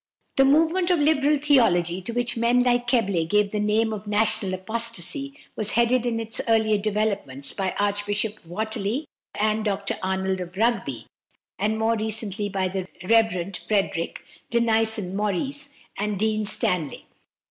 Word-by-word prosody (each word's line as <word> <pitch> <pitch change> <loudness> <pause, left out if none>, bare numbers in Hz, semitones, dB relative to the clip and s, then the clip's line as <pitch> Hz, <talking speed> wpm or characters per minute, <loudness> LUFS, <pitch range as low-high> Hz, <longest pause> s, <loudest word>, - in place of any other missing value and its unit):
The 270 - +5
movement 325 +6 +3
of 355 - +4
Liberal 295 -1 +3
theology, 190 - +3
to 210 - -5
which 245 +1 -1
men 240 +2 +3
like 245 -1 +2
Keble 200 -9 +2
gave 210 0 +2
the 210 - -1
name 215 +2 +1
of 210 0 -7
"national 210 -2 +1
apostasy," 230 - -3 0.2
was 215 -1 0
headed 235 +1 +3
in 230 -1 -1
its 225 +2 -1
earlier 220 -2 +3
developments 200 -10 -1
by 190 -2 -2
Archbishop 205 +1 -1
Whately 220 - -3 0.3
and 215 +1 +1
Dr 200 -1 -2
Arnold 190 0 -1
of 180 +1 -8
Rugby, 195 - 0 0.5
and 215 +3 0
more 225 +1 +2
recently 215 -2 -2
by 190 -1 0
the 185 0 -4 0.2
Rev. 200 -5 +2
Frederick 195 -5 -1 0.3
Denison 220 -4 +1
Maurice 270 +9 -1 0.2
and 205 0 -2
Dean 215 +1 0
Stanley. 180 - 0
215 Hz, 145 wpm, -24 LUFS, 195-235 Hz, 0.5 s, The